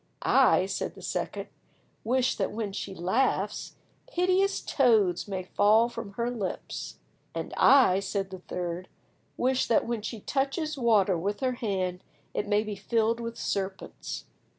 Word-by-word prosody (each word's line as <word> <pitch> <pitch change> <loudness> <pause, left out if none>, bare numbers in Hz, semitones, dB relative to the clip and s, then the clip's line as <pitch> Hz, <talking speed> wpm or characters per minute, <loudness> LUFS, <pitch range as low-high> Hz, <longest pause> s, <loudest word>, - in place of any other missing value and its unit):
"I," - - +5
said - - -3
the - - -12
second, - - -3 0.6
"wish 255 +2 +2
that 195 - -1
when 210 -2 -3
she 195 -1 -5
laughs, 205 +2 0 0.3
hideous 375 -1 +2
toads 215 - +3
may 190 -2 -3
fall 215 +5 +4
from 220 -4 -7
her 235 +3 -1
lips." 210 -7 -5 0.4
"And - - -4
I," 250 -9 +6
said 195 -1 -3
the 185 - -7
third, 180 +1 -4 0.5
"wish 260 +1 +1
that 230 - +3
when 235 -2 -2
she 220 0 -5
touches 285 - -1
water 210 - +3
with 205 +6 -2
her 260 -1 +2
hand 190 -6 -2 0.3
it 210 - -2
may 205 0 +2
be 215 -1 -5
filled 225 +3 +1
with 230 0 -5
serpents." 195 -1 -4
215 Hz, 150 wpm, -28 LUFS, 195-245 Hz, 0.6 s, I